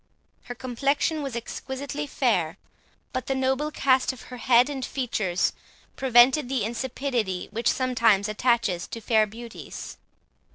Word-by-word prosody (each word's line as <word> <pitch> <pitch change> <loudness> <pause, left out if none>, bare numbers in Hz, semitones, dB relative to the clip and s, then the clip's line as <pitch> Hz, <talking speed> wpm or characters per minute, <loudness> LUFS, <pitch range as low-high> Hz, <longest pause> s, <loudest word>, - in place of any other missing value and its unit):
Her 245 - -6
complexion 275 +5 0
was 275 -4 -4
exquisitely 275 +5 -5
fair, 195 - 0 0.6
but 255 -2 -3
the 270 - 0
noble 265 +3 0
cast 260 -3 +2
of 260 - -12
her - - -6
head 245 +1 +4
and 275 -3 -4
features 215 -9 -1 0.4
prevented 255 +2 +5
the 260 -5 0
insipidity 235 -4 -2
which 230 +2 +1
sometimes 230 -6 +2
attaches 215 -5 +1
to 230 - -6
fair 220 -1 +3
beauties. 230 +2 -9
245 Hz, 130 wpm, -26 LUFS, 225-265 Hz, 0.6 s, prevented